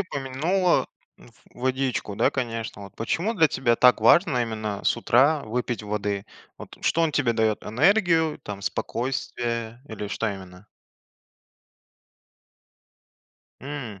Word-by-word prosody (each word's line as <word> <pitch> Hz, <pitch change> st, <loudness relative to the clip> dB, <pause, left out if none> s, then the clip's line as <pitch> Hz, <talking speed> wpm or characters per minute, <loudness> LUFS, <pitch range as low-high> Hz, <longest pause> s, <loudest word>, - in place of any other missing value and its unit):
упомянула 165 Hz, +5 st, 0 dB, 0.3 s
в -, -, -18 dB, 0.3 s
водичку, 130 Hz, -5 st, -1 dB
да, 115 Hz, -, +3 dB
конечно. 115 Hz, -5 st, -4 dB
Вот 100 Hz, -, -12 dB
почему 175 Hz, -, -1 dB
для 160 Hz, -5 st, +5 dB
тебя 120 Hz, -4 st, +1 dB
так 125 Hz, -1 st, +5 dB
важно 125 Hz, -, +4 dB
именно 110 Hz, -3 st, -4 dB
с -, -, +2 dB
утра 140 Hz, +6 st, +3 dB
выпить 120 Hz, +1 st, -3 dB
воды? 105 Hz, -1 st, -3 dB, 0.3 s
Вот -, -, -11 dB
что 165 Hz, -, +1 dB
он 160 Hz, -2 st, +1 dB
тебе 130 Hz, -6 st, +2 dB
дает: 110 Hz, -2 st, 0 dB
энергию, 165 Hz, -, +2 dB
там, 100 Hz, -1 st, -7 dB
спокойствие 120 Hz, -1 st, -3 dB
или 105 Hz, -2 st, -6 dB
что 115 Hz, +2 st, -2 dB
именно? 95 Hz, -1 st, -9 dB, 2.9 s
М. 130 Hz, -7 st, -7 dB
120 Hz, 120 wpm, -25 LUFS, 110-145 Hz, 2.9 s, для